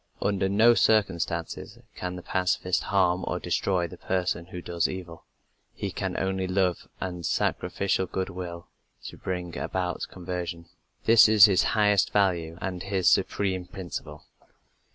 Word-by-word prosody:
Under 95 -1 0
no 110 +4 +6
circumstances 85 -7 0 0.2
can 90 0 -4
the 90 - -8
pacifist 90 -1 0
harm 95 -2 +2
or 90 - -1
destroy 90 +1 0
the - - -12
person 90 -2 -1
who 90 -1 -7
does 85 -1 -1
evil; 90 -3 -8 0.5
he - - -4
can - - -3
use - - -2
only 95 0 -1
love 90 -1 0
and 90 -2 -5
sacrificial 95 +3 0
goodwill 90 -2 -5 0.4
to - - -8
bring 90 -2 -4
about 90 -1 -3
conversion. 90 -2 -5 0.4
This 115 -1 +7
is 110 -2 +9
his 95 -4 +4 0.2
highest 105 -2 +3
value 85 -5 +1
and 90 -1 -4
his 95 -1 -1
supreme 95 -3 0
principle. 90 -1 -7
90 Hz, 140 wpm, -27 LUFS, 90-95 Hz, 0.5 s, is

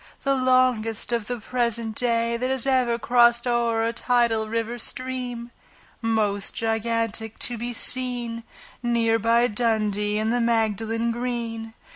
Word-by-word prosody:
The 275 - +2
longest 255 -4 +2
of 230 -3 -1
the 245 -1 -3
present 235 -1 -1
day 230 0 0
That 250 +2 -2
has 265 -2 +1
ever 255 -3 +2
crossed 240 0 +3
o'er 235 -2 +1
a 230 - -1
tidal 235 -2 +1
river 230 +2 -3
stream, 250 -1 -4 0.5
Most 215 -3 0
gigantic 225 -1 -1
to 245 - -1
be 240 +2 -4
seen, 240 -1 -1 0.4
Near 230 -2 +2
by 230 +2 +3
Dundee 210 -2 0
and 220 +2 0
the 245 - +1
Magdalen 225 0 0
Green. 230 -2 -4
235 Hz, 135 wpm, -24 LUFS, 225-245 Hz, 0.5 s, crossed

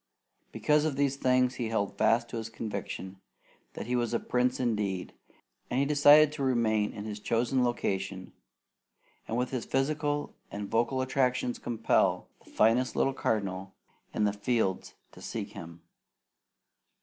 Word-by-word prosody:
Because 150 0 +2
of 155 -3 0
these 140 -1 +1
things 125 -1 +2
he 120 -3 -3
held 105 -3 -1
fast 120 +1 +2
to - - -5
his 115 0 -5
conviction 100 -3 -6 0.5
that - - -6
he 125 +2 -1
was 120 -1 0
a - - +1
prince 125 0 0
indeed; 105 -7 -1 0.6
and 125 - 0
he 140 - +3
decided 150 +1 +6
to 150 -2 -4
remain 110 -5 +1
in 105 - -7
his 105 -1 -5
chosen 120 +4 +1
location 95 -5 -2 0.9
and 115 - -2
with 125 0 -1
his 130 -3 -2
physical 145 +2 -1 0.2
and 100 0 -6
vocal 120 +3 +1
attractions 125 -2 0
compel 115 -2 +1 0.2
the - - -19
finest 120 +4 +2
little 135 - +2
cardinal 95 -6 -2 0.4
in 105 - -1
the 105 -1 +2
fields 105 -2 -1 0.2
to - - -14
seek 110 -3 -5
him. 85 -5 -10
120 Hz, 150 wpm, -29 LUFS, 105-130 Hz, 0.9 s, decided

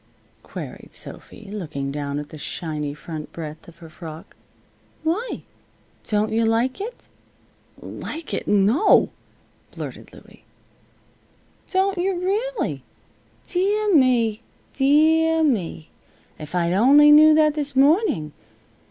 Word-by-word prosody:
queried - - -9
Sophy, 220 - -11
looking 155 -9 -4
down 140 0 -4
at 150 0 -6
the 155 - -10
shiny 150 -2 -4
front 150 +1 -8
breadth 155 -1 -8
of 170 -1 -15
her 170 -1 -12
frock. 160 +2 -11 0.7
"Why? 365 +10 -2 0.6
Don't 215 0 0
you 225 +1 +1
like 230 - 0
it?" 465 +5 -7 0.7
"Like 320 +1 -7
it! - - -3
No!" 215 - +4 0.6
blurted - - -9
Louie. - - -17 1.3
"Don't 385 0 +1
yuh, 380 +1 0
rully! 420 +8 -2 0.6
Deah 405 +3 0
me! 240 -6 +3 0.3
Deah 320 +3 +3
me! 190 - -1 0.5
If 155 +3 -8
I'd 175 0 +1
only 280 +9 +6
knew 305 +1 +8
that 305 -1 +4
this 290 -2 -4
morning. 280 - +2
255 Hz, 115 wpm, -22 LUFS, -, 1.3 s, knew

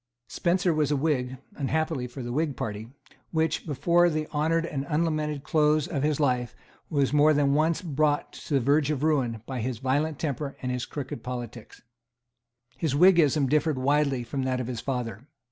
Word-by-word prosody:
Spencer 180 0 +1
was 155 -2 +1
a 150 - +2
Whig, 135 -3 -1 0.2
unhappily 155 -3 -1
for 130 +1 -8
the 120 - -5
Whig 145 +1 -1
party, 110 +1 -5 0.4
which, 160 0 -1
before 170 +4 +3
the 155 -1 -1
unhonoured 165 +2 +1
and 140 -5 -3
unlamented 155 -2 -1
close 150 -2 +2
of 150 -6 -2
his 150 0 0
life, 125 -5 0 0.3
was 140 -2 +1
more 150 +1 +5
than 140 -1 +3
once 160 +4 +1
brought 150 -2 0
to 150 - -4
the - - +4
verge 140 +3 +2
of 150 -2 -1
ruin 125 -8 0
by 130 -1 -4
his 125 0 -2
violent 140 +5 0
temper 145 -2 -3
and 125 - -1
his 125 -1 -3
crooked 135 -5 -6
politics. 120 -2 -7 1.0
His 155 -5 0
Whiggism 160 -4 +5
differed 150 +1 +1
widely 140 -1 +1
from 135 +3 -4
that 130 -1 -1
of 125 - -2
his 120 -2 -4
father. 125 -2 -4
145 Hz, 180 wpm, -27 LUFS, 130-155 Hz, 1.0 s, more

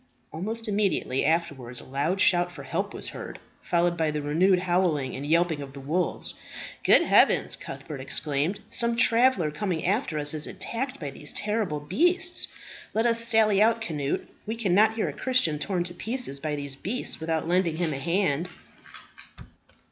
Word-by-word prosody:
Almost 220 +8 -4
immediately 200 -10 0
afterwards 140 -7 -1
a - - -10
loud 145 +8 -1
shout 175 -1 +3
for - - -10
help - - -2
was - - -3
heard, - - -8 0.2
followed 175 0 +1
by 160 -2 +1
the 150 -1 -3
renewed 180 +6 +3
howling 175 -7 0
and 135 - -6
yelping 165 -1 +2
of 135 -1 -8
the 140 - -9
wolves. 160 +6 -1 0.5
"Good - - +6
heavens!" - - +3
Cuthbert 135 +1 -8
exclaimed. 150 +7 0
"Some 235 -1 +1
traveller 230 -8 +4
coming 175 0 -3
after 190 - 0
us 145 0 0
is 150 -1 +1
attacked 260 +3 -4
by 145 -3 -5
these 145 +1 0
horrible 210 -8 -1
beasts. 350 - +2 0.5
Let 225 +2 +2
us 230 -1 +3
sally 220 -3 +4
out, 230 +1 +4
Cnut. 150 -10 -2 0.3
We 220 - -2
cannot 215 0 +3
hear 225 - -1
a - - -4
Christian 210 - +1
torn 180 +2 -1
to 175 0 -7
pieces 220 - -3
by 150 +1 -2
these 140 -1 -4
beasts, 205 - -3
without 160 0 -2
lending 175 -2 +1
him 165 -3 0
a 135 - -4
hand." 170 0 0
175 Hz, 170 wpm, -26 LUFS, 150-215 Hz, 0.5 s, Good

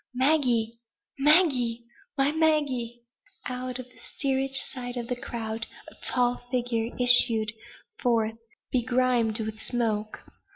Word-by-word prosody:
"Maggie, 250 -5 0 0.4
Maggie! 275 -7 +2 0.3
My 275 +1 +1
Maggie!" 285 -7 -1 0.4
Out 250 0 -5
of 255 - -8
the 250 - -22
steerage 270 -1 -3 0.2
side 245 -1 -7
of 240 - -4
the 250 - -3
crowd 225 -3 -6 0.2
a - - -17
tall 245 -1 +2
figure 240 -2 -2
issued 235 -3 +8 0.5
forth, 225 -2 -1 0.3
begrimed 245 -3 0
with 220 0 -6
smoke. 220 -3 -3
245 Hz, 115 wpm, -25 LUFS, 230-260 Hz, 0.5 s, issued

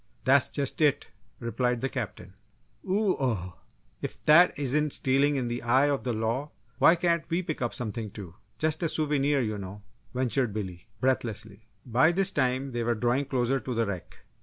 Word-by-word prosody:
"That's 135 +1 +5
just 140 +1 0
it!" 145 -2 +2 0.3
replied 125 0 -1
the 135 - 0
Captain. 105 -8 -6 0.6
"Oo 200 0 +2
oh! 95 -10 -2 0.4
if - - -5
that 170 +4 +6
isn't 145 +1 +1
stealing 140 +2 +2
in 130 -3 -1
the 120 +1 -3
eye 130 +4 +3
of 140 - -2
the 125 - 0
law, 115 +6 -2 0.3
why 170 - +7
can't 170 -1 +1
we 175 +2 0
pick 155 -5 -5
up 120 - 0
something 110 -2 -4
too 95 -5 -10 0.2
just 155 +3 0
a 165 - +1
souvenir, 145 -2 +1
you 110 -3 -2
know!" 100 +1 -8 0.3
ventured 125 -3 0
Billy, 90 -4 -6
breathlessly. 110 -5 -2 0.2
By 130 +7 +4
this 195 +2 +1
time, 130 0 0
they 120 -1 -2
were 120 0 0
drawing 120 +5 0
closer 130 0 0
to 125 +1 -5
the 115 0 +1
wreck. 95 -4 -6
130 Hz, 180 wpm, -27 LUFS, 115-145 Hz, 0.6 s, why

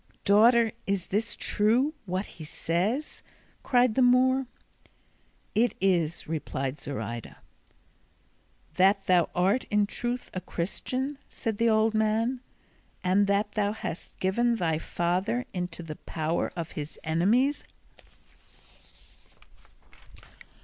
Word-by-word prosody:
"Daughter, 225 +3 +5 0.2
is 195 -3 0
this 215 +2 +1
true, 240 +8 +2
what 185 +3 -2
he 160 - -11
says?" 185 - -2 0.4
cried 245 -3 +3
the 260 - +2
Moor. 255 +1 +4 1.1
"It 230 +3 +2
is," 175 -4 +1
replied 140 -3 -3
Zoraida. 115 -5 -5 1.4
"That 195 +2 +4
thou 180 -2 +3
art 195 +8 +2
in 210 0 +3
truth 240 +4 -4
a 185 - -3
Christian," 255 +11 -3
said 220 -2 -3
the 230 +1 +3
old 220 0 +3
man, 220 +3 +1 0.6
"and 190 +2 +3
that 200 +1 +1
thou 205 -1 0
hast 180 -6 -7
given 235 +6 +2
thy 165 -7 0
father 185 +10 -1
into 180 -2 -4
the 155 -2 -7
power 160 +1 -2
of 170 -2 -5
his 150 0 -6
enemies?" 210 - +2
200 Hz, 110 wpm, -28 LUFS, 175-235 Hz, 1.4 s, Daughter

